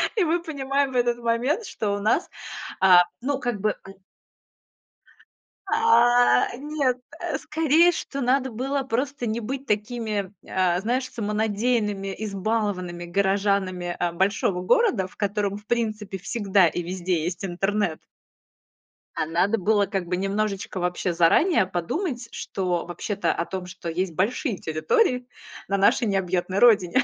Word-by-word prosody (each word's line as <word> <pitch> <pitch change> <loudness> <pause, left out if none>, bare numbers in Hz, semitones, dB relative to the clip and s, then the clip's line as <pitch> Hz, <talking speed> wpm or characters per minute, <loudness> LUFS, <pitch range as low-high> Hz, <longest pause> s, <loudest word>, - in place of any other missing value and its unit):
И 410 - +3
мы 340 +1 +1
понимаем 275 -3 -1
в - - -8
этот 240 -1 +2
момент, 240 - 0
что 210 - -3
у - - -4
нас, 215 - +1 0.5
а 180 -2 +7 0.2
ну, 275 +1 -1
как 240 -6 -2
бы 210 +1 +1
э, - - -10
н 195 - -19 1.7
А, 245 - +4
нет, 280 -3 -1 0.2
э, - - -2
скорее, 320 +2 +3
что 275 -4 -5
надо 260 +1 +2
было 270 +5 -2
просто 260 0 -2
не 220 +2 -1
быть 265 +4 -5
такими, 210 -2 -2
а, 180 -1 +1
знаешь, 250 +4 -1
самонадеянными, 210 -2 -1
избалованными 200 -4 -2
горожанами, 190 -1 0
а, 175 -1 0
большого 190 0 0
города, 195 - +2
в - - -20
котором, 205 -1 -1
в 210 - -15
принципе, 215 -4 -2
всегда 195 -2 +2
и 175 - -2
везде 175 -2 -2
есть 180 +3 -3
интернет. 195 -1 -1 1.2
А - - 0
надо 180 +7 +1
было 205 +1 +2
как 195 -2 -3
бы 180 - 0
немножечко 195 0 -2
вообще 180 0 -1
заранее 185 - +4
подумать, 235 - -3
что 180 -3 -2
вообще-то 190 +4 -2
о 170 - -2
том, 185 -1 -5
что 180 -1 -7
есть 175 +1 -2
большие 215 - 0
территории 250 - +1 0.4
на 200 +1 0
нашей 215 +4 +3
необъятной 190 0 0
родине, 230 +1 +5
205 Hz, 140 wpm, -24 LUFS, 185-245 Hz, 1.7 s, а